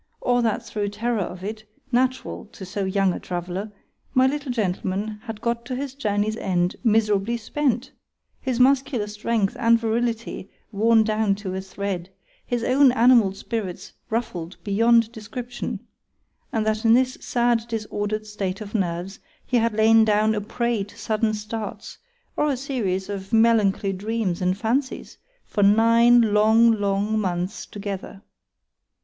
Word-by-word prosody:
—or 245 0 +2
that 230 0 -1
through 205 -3 -3
terror 225 +2 -1
of 180 0 -6
it, 215 +2 -5 0.3
natural 255 +1 0
to 205 -2 -11
so 195 +2 -3
young 190 -1 +1
a - - -5
traveller, 180 +4 -5 0.4
my 255 0 +5
little 280 0 -1
Gentleman 205 -1 -2
had 225 -3 -7
got 235 0 -1
to 255 - -3
his 270 0 -4
journey's 215 -5 -1
end 180 -3 0
miserably 215 0 +2
spent;—his 260 0 -4
muscular 265 -3 +3
strength 210 0 -1
and 230 0 +4
virility 230 -3 -2 0.2
worn 220 +2 +4
down 215 -2 +1
to 195 -2 -6
a 190 - -3
thread;—his 195 +4 -5
own 265 +1 +5
animal 235 -4 +5
spirits 195 -2 -5 0.2
ruffled 190 -7 -3
beyond 230 +2 +3
description,—and 230 -1 -7
that 215 0 0
in 225 0 +6
this 255 0 +1
sad 235 -1 +1
disorder'd 215 -1 -3
state 200 -3 -4
of 210 -1 -8
nerves, 185 -1 -2 0.3
he 250 - +1
had 230 -1 +1
lain 220 +1 +6
down 215 0 +3
a 210 - -1
prey 235 0 -1
to 205 +2 -14
sudden 215 0 0
starts, 210 +1 -6 0.4
or 300 - +1
a 275 - 0
series 220 -9 -2
of 195 -1 -6
melancholy 220 -3 +3
dreams 200 -2 -2
and 185 +1 +1
fancies, 260 +6 -2 0.3
for 205 - -2
nine 230 +2 +5
long, 220 +2 +5
long 205 0 0
months 185 0 -3
together. 200 -1 -7
220 Hz, 145 wpm, -23 LUFS, 200-235 Hz, 0.4 s, in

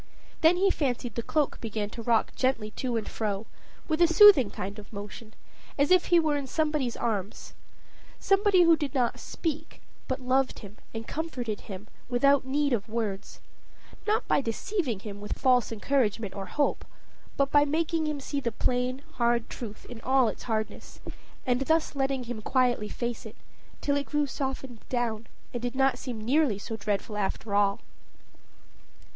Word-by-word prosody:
Then 330 +2 +6
he 390 +1 +3
fancied 250 -4 -1
the 235 - -2
cloak 295 +4 0
began 215 -2 -3
to 235 - -7
rock 230 -1 +2
gently 245 -5 0
to 245 -1 -2
and 220 - -3
fro, 210 -1 -2 0.4
with 315 +1 0
a 345 - +7
soothing 335 - +8
kind 200 +3 -6
of 210 - -13
motion, 210 +2 -9 0.4
as 285 +4 +2
if 365 -1 +6
he 345 - +5
were 310 -2 +1
in 280 -2 -4
somebody's 300 -5 0
arms: 210 -3 -3 0.7
somebody 390 -2 +4
who 335 -1 +6
did 290 -3 -4
not 245 -3 +1
speak, 315 -1 -4 0.3
but 260 0 -2
loved 260 +1 +1
him 205 -1 -11
and 225 0 -6
comforted 250 -9 -4
him 195 +1 -9 0.2
without 275 +2 +4
need 285 +1 +1
of 210 -2 -1
words; 215 -4 -4 0.7
not 425 +1 +1
by - - +3
deceiving 245 - -2
him 205 -1 -8
with 205 - -4
false 250 -4 +3
encouragement 225 -3 0
or 195 -1 -6
hope, 285 +9 0 0.5
but 275 0 +2
by 290 0 +6
making 315 +2 0
him 300 -1 -2
see 280 +1 -3
the 240 -4 -2
plain, 250 +4 -1
hard 235 -1 +1
truth 215 -4 -7
in 240 -2 -9
all 260 0 +3
its - - -7
hardness, 220 -1 -3 0.5
and 250 0 +1
thus 320 +3 +1
letting 270 -1 0
him 240 -2 -6
quietly 245 -3 +1
face 240 0 -4
it, 220 - -10 0.5
till 285 - +1
it 285 0 -1
grew 295 -1 +1
softened 265 -3 -4
down, 230 -3 -1 0.3
and 240 - -3
did 245 +1 -3
not 270 0 +2
seem 245 -4 -5
nearly 250 0 +2
so 225 +2 -6
dreadful 210 0 -2
after 200 +1 -2
all. 200 -1 +2
250 Hz, 170 wpm, -28 LUFS, 220-285 Hz, 0.7 s, soothing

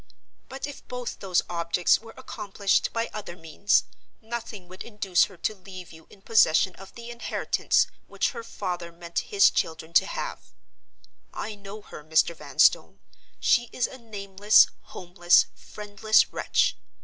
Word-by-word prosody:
But 270 +1 -5
if 285 -1 -10
both 250 -1 -6
those 185 -3 +1
objects 170 0 +1
were 225 0 -14
accomplished 200 -5 -1
by 230 0 -2
other 205 -5 -7
means, 165 +4 +1 0.4
nothing 225 -4 -7
would 185 +1 -12
induce 205 -5 +1
her 190 - -15
to 215 - -2
leave 185 -2 -11
you 160 0 -16
in 195 - -18
possession 190 -5 +4
of 195 0 -13
the 235 0 -9
inheritance 235 0 0 0.2
which - - -1
her 235 - -7
father 175 -5 -5
meant 170 0 -4
his 200 -1 +5
children 160 0 -3
to - - +5
have. - - -6 0.8
I 220 - -4
know 205 +1 -10
her, 150 - -11
Mr. 160 +2 +2
Vanstone! - - +2 0.4
She 240 -2 +2
is 245 - 0
a 260 - -8
nameless, 205 -2 +3
homeless, 175 0 +2
friendless 210 +1 0
wretch. - - +1
200 Hz, 150 wpm, -26 LUFS, 175-225 Hz, 0.8 s, his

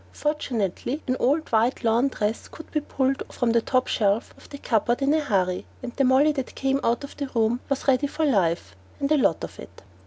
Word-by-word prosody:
Fortunately, 270 - -2
an 255 - 0
old 295 +5 +1
white 230 +3 +2
lawn 235 +3 +3
dress 220 -4 -2
could 320 - -12
be 305 - 0
pulled 270 -2 -1
from 245 -2 0
the 230 0 +3
top 255 +2 +1
shelf 205 +1 0
of - - -18
the 285 - -8
cupboard 240 -2 0
in 280 +1 +2
a 315 - +3
hurry, 190 -10 0 0.2
and 245 -1 -6
the 275 - +2
Molly 265 +4 +5
that 270 -4 -5
came 270 0 0
out 235 +4 +1
of 280 - -9
that 275 -3 -5
room 230 +1 +2
was 275 0 -2
ready 270 +2 +3
for 315 +3 -1
life 180 - +1 0.2
and 280 +1 -1
a 305 - +5
lot - - +2
of - - -7
it. - - -12
255 Hz, 220 wpm, -25 LUFS, 225-280 Hz, 0.2 s, Molly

